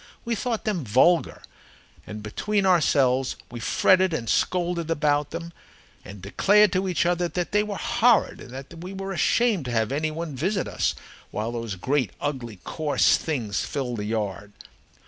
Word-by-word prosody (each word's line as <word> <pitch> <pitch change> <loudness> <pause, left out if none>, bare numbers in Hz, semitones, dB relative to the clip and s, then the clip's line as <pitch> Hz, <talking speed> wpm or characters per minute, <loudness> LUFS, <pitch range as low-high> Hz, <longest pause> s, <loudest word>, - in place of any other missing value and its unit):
We 235 - -1
thought 230 0 -2
them 200 -8 -1
vulgar, 130 +10 +2 0.6
and 105 0 -7
between 200 - -1
ourselves 135 -7 +3 0.2
we 120 - -6
fretted 185 +8 +3
and 115 -6 -4
scolded 175 +1 0
about 145 -2 +1
them 170 +1 -7 0.5
and 100 -2 -11
declared 205 - +4
to 190 +1 0
each 175 -2 +1
other 175 0 +1
that 175 0 -3
they 210 - +3
were 210 -2 -4
horrid, 235 -3 +2
and - - -11
that 135 +5 -9
we 180 +3 -7
were 195 0 -5
ashamed 205 - +2
to 125 - -4
have 110 -1 0
any 155 +3 0
one 155 -1 -5
visit 185 +8 -1
us - - -1 0.3
while 110 +2 -3
those 115 -4 -4
great, 130 +2 -1
ugly, 125 -6 -4
coarse 155 -2 +2
things 120 - -2
filled 125 -4 -3
the 105 - -4
yard. 105 -2 -3
155 Hz, 165 wpm, -25 LUFS, 120-185 Hz, 0.6 s, declared